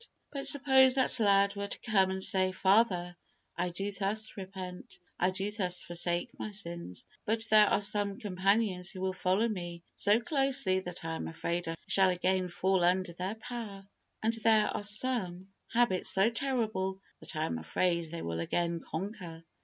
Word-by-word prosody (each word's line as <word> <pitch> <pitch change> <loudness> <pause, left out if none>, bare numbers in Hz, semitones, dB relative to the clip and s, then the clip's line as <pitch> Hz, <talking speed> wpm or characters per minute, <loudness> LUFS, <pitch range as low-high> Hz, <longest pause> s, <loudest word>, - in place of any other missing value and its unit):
But 275 -1 -3
suppose 265 -2 +6
that 260 -1 +1
lad 200 -1 +3
were 200 0 -4
to - - -4
come 195 -4 +2
and 190 0 -2
say, 185 -1 +2
"Father, 190 -2 +2 0.4
I 180 +1 -1
do 195 +4 -4
thus 205 +2 0
repent; 185 -2 -8 0.2
I 180 - +3
do 195 +2 -3
thus 185 -4 +1
forsake 175 -1 -1
my - - -4
sins; 170 - -6 0.2
but 225 +1 0
there 215 -1 +7
are - - +2
some 205 -1 0
companions 195 -1 0
who 185 - -8
will 190 0 -1
follow 190 +4 +1
me 175 -5 -5
so 205 +2 +3
closely 270 -7 +1
that 180 -3 -8
I 165 - -3
am - - -5
afraid 170 +2 -3
I 165 - -3
shall 190 -1 +4
again 185 +1 0
fall 185 +1 +1
under 180 0 +1
their 185 +5 -4
power, 220 -4 -8 0.4
and 225 +1 +2
there 225 -2 +3
are - - -3
some 205 -4 -1 0.2
habits 230 -6 +2
so 195 +4 +3
terrible 220 -7 -2 0.2
that - - -9
I 155 +1 0
am 80 - -3
afraid 170 - 0
they 170 +1 -6
will 85 0 -3
again 170 - -1
conquer. 175 -2 -7
190 Hz, 175 wpm, -31 LUFS, 180-215 Hz, 0.4 s, there